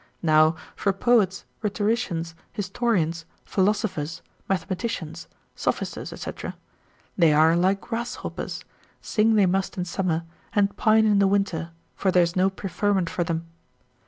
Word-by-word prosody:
Now 155 0 +5 0.2
for 200 - +1
poets, 195 -3 +2 0.2
rhetoricians, 205 -6 -1 0.2
historians, 185 -5 0 0.2
philosophers, 190 -6 0 0.3
mathematicians, 185 -4 -3 0.3
sophisters, - - -2
&c. - - -4 0.9
they 165 -3 +6
are 160 +2 +5
like 190 +3 +2
grasshoppers, 235 +1 -5 0.3
sing 220 +1 +2
they 205 -2 +5
must 190 +2 0
in 180 - -1
summer, 170 -2 -1 0.3
and 200 -1 +2
pine 220 0 +4
in 210 -2 +4
the 200 - +5
winter, 190 -4 0 0.3
for 195 - 0
there 180 -1 +5
is 170 0 -2
no 185 +1 +4
preferment 195 -1 -1
for 175 - 0
them. 165 -1 -2
190 Hz, 130 wpm, -25 LUFS, 170-205 Hz, 0.9 s, they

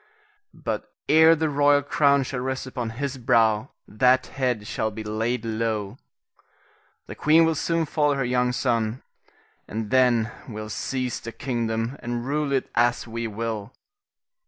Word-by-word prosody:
But - - -4 0.2
ere 160 +1 +7
the 160 0 0
royal 145 0 +3
crown 140 -1 +3
shall 130 0 -4
rest 130 +1 -3
upon 125 -3 -4
his 140 -1 -3
brow, 115 -1 +2 0.2
that 125 +4 +3
head 125 -6 -2
shall 110 - -2
be 110 +1 -7
laid 110 +3 -2
low. 110 -1 -2 1.1
The - - -8
queen 160 +2 +4
will 165 - +2
soon 165 +1 0
follow 145 -1 +1
her 135 -2 -1
young 125 0 +1
son, 120 -2 -1 0.6
and 110 +1 -5
then 120 -4 +3 0.2
we'll 110 -1 -6
seize 125 +2 -3
the 115 - -7
kingdom 115 0 -2
and 120 0 -3
rule 145 +1 -1
it 135 -1 0
as 120 +1 +2
we 115 0 -4
will. 110 -1 -4
125 Hz, 150 wpm, -24 LUFS, 115-140 Hz, 1.1 s, ere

